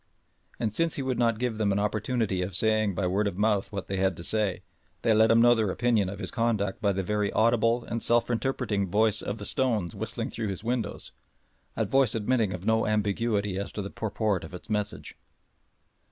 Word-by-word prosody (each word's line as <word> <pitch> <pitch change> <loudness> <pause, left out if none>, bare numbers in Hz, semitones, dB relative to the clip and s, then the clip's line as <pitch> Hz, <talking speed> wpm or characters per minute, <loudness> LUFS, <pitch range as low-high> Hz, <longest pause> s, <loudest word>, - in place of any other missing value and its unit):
And 110 -2 -1
since 165 +6 +1
he 140 - -3
would 130 -1 -2
not 115 -2 +2
give 120 -2 -2
them 105 -2 +2
an 100 - +1
opportunity 105 -1 -1
of 90 0 -3
saying 110 -1 +1
by 95 - -1
word 100 +4 +1
of 100 - -4
mouth 105 -1 +1
what 100 -2 -4
they 95 - -3
had 95 -2 +1
to 85 - -7
say, 100 -2 0 0.4
they 115 - +4
let 110 +1 +5
him 115 0 +5
know 120 0 +7
their 110 -4 +1
opinion 110 -1 +1
of 100 - -6
his - - -5
conduct 110 -4 -1
by 100 -2 +2
the 95 0 -2
very 105 +1 0
audible 115 +1 +2
and 115 0 -4
self 120 +1 +3
interpreting 115 -5 -1
voice 105 +2 +2
of 100 - -4
the - - -7
stones 115 - 0
whistling - - -4
through 110 -1 -3
his 100 +1 -5
windows 115 -3 -3 0.7
a - - +1
voice 135 -5 +2
admitting 115 -1 +1
of 90 0 -6
no 110 0 +2
ambiguity 105 -1 0
as 100 - -5
to 105 - -4
the 100 - -6
purport 105 -3 -1
of 80 +3 -8
its 90 - -10
message. 105 -1 -3
105 Hz, 210 wpm, -27 LUFS, 100-115 Hz, 0.7 s, know